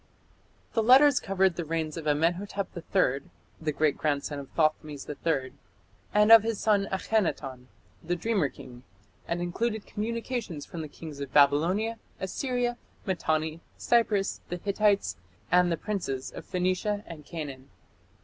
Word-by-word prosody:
The 225 - +2
letters 265 +4 +7
covered 190 -2 +1
the 175 - -1
reigns 160 -1 -2
of 160 -2 -5
Amenhotep 175 +6 0
III, 165 -6 0 0.3
the 155 -1 0
great 150 0 +1
grandson 145 -1 -1
of 140 - -9
Thothmes 155 -3 0
III, 145 -3 -2 0.6
and 210 +1 +4
of 225 -1 +11
his 225 -1 -2
son 205 -2 +2
Akhenaton, 160 - -1 0.4
"the 175 +2 -1
dreamer 190 -5 +1
king", 125 -1 -12 0.5
and 175 +1 -1
included 215 +5 -2
communications 225 - -4
from 170 - -7
the 155 - -5
kings 150 -1 -9
of 140 -2 -5
Babylonia, 170 - +3 0.2
Assyria, 240 +5 -1 0.3
Mitanni, 160 -4 -1 0.2
Cyprus, 220 -4 +1
the 175 - -3
Hittites, 200 +2 +1 0.3
and 180 0 +5
the 165 - 0
princes 170 -10 -3
of - - -9
Phoenicia 185 +3 0
and 160 -3 -9
Canaan. 140 -5 -7
175 Hz, 140 wpm, -28 LUFS, 150-210 Hz, 0.6 s, of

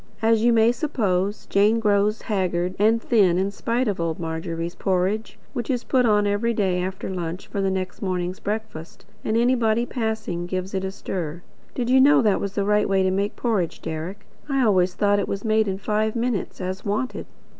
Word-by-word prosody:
As 225 0 +3
you 240 - +5
may 230 0 +5
suppose, 205 - -1
Jane 210 +3 +3
grows 210 0 +1
haggard 185 -3 -1
and 220 +2 +4
thin 200 -7 +3
in 195 +2 0
spite 235 +4 -1
of 200 -4 -1
old 165 -1 -2
Margery's 165 +1 -4
porridge 190 +4 -1 0.2
which 240 -4 -4
is 250 -3 0
"put 250 -2 +2
on" 210 -1 +3
every 210 +3 0
day 185 -4 +1
after 190 +1 -4
lunch, 180 -1 -4
for 200 - -3
the 195 - +1
next 190 -1 -3
morning's 185 -1 -2
breakfast, 210 -6 -5 0.2
and 220 - 0
anybody 235 -1 +2
passing 220 -8 -3
"gives 185 +1 -4
it 190 -1 -1
a 190 - -2
stir." 175 -3 -5 0.3
Did 245 -1 -1
you 260 0 +6
know 285 0 +6
that 210 -3 +2
was 200 -1 -3
the 200 - 0
right 210 0 +2
way 195 -1 +3
to 185 - +2
make 200 +2 -1
porridge, 210 -9 -1
Deryck? 175 +6 -6 0.2
I 275 -2 +2
always 185 -4 +3
thought 205 +1 +2
it 200 - -1
was 200 +2 -4
made 220 0 +2
in 190 -1 -2
five 215 +2 -1
minutes, 235 -3 -2
as 185 0 -4
wanted. 210 +6 -2
205 Hz, 200 wpm, -23 LUFS, 185-225 Hz, 0.3 s, you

